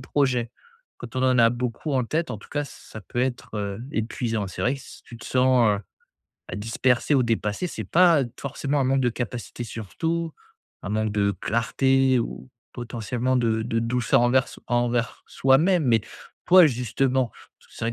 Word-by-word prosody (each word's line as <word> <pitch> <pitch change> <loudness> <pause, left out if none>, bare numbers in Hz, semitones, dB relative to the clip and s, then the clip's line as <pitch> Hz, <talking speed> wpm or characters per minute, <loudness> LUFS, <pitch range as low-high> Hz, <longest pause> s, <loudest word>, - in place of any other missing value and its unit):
projets, 130 -3 0 0.5
quand 120 +1 -9
on 130 - 0
en 130 -1 +3
a 115 -1 +7
beaucoup 125 +4 -3
en 130 -2 +1
tête, 160 +5 -2
en 120 - -3
tout - - -16
cas, 145 0 -2
ça 110 -5 -11
peut 120 +4 -4
être 105 -5 -3
épuisant. 110 -2 -2
C'est 90 - -8
vrai 125 - +2
que 140 - -9
si - - -13
tu 120 - -12
te 115 - -12
sens, 125 -5 +3 0.7
heu, - - -4
dispersé 120 +5 +1
ou 135 - +4
dépassé, 115 - -1
c'est - - -6
pas 170 -5 +4
d 120 - -8
forcément 140 +1 -2
un 135 - +2
manque 135 +1 +2
de 125 - +2
capacité 120 0 -5
sur 110 -3 -8
tout. 165 0 -1 0.5
Un - - -5
manque 110 0 0
de 100 -1 +1
clarté 130 +3 +2
ou, 125 +2 -5 0.2
potentiellement, 120 +1 -2
de 115 -2 +1
de 115 0 -1
douceur 115 +1 +2
envers 125 +1 +4
s - - -12
envers 120 0 0
soi-même. 155 +6 +3
Mais 115 -3 +3 0.5
toi, 180 -2 +8
justement, 130 0 0 0.3
parce - - -24
que - - -20
c'est - - -4
vrai 115 - -1
125 Hz, 190 wpm, -24 LUFS, 115-135 Hz, 0.7 s, toi